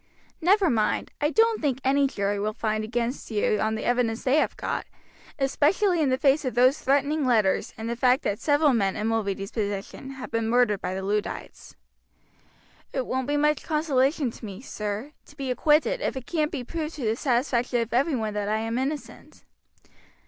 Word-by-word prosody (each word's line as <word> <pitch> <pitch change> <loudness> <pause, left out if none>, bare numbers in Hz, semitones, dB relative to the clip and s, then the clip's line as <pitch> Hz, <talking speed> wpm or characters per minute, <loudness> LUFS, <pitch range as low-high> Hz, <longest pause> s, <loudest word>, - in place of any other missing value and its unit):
Never 380 +3 +4
mind, 215 -3 0
I 295 - +3
don't 450 +4 +3
think 275 -4 0
any 275 +1 +3
jury 200 -5 -2
will 215 +1 -2
find 215 -1 -1
against 240 +3 -3
you 210 -1 +1
on 220 0 0
the 220 - -4
evidence 240 -2 0
they 265 +3 +3
have - - +1
got, - - -3 0.5
especially 320 +6 +2
in 290 - +2
the 255 - +2
face 280 +2 +3
of 255 -3 -3
those 255 +4 +4
threatening 285 +3 +1
letters 220 -7 +2
and 220 - -5
the 235 - -2
fact 250 +3 +3
that 205 0 -1
several 290 -1 +3
men 195 -5 +1
in 210 - -3
Mulready's 200 -3 -2
position 205 +5 -4
have 265 -1 -8
been 225 -1 -1
murdered 240 -4 +2
by 185 +1 -3
the 190 - -4
Luddites." 205 +1 -4 1.2
"It 260 -2 -2
won't 260 +1 -2
be 290 0 +1
much 300 0 +2
consolation 285 -3 +1
to - - -15
me, 200 -3 -7
sir, 210 +1 -5 0.2
to 290 - -17
be 270 -2 -3
acquitted 315 - +2
if 275 - -2
it 255 - -6
can't 310 -1 -1
be 270 -5 -4
proved 315 +4 -4
to 275 -6 -4
the 220 +1 +1
satisfaction 245 -1 0
of 230 0 -4
every 275 +5 +2
one 220 -3 -2
that 205 0 -2
I 215 - +1
am 225 +2 -2
innocent." 280 +3 -5
250 Hz, 195 wpm, -26 LUFS, 220-290 Hz, 1.2 s, Never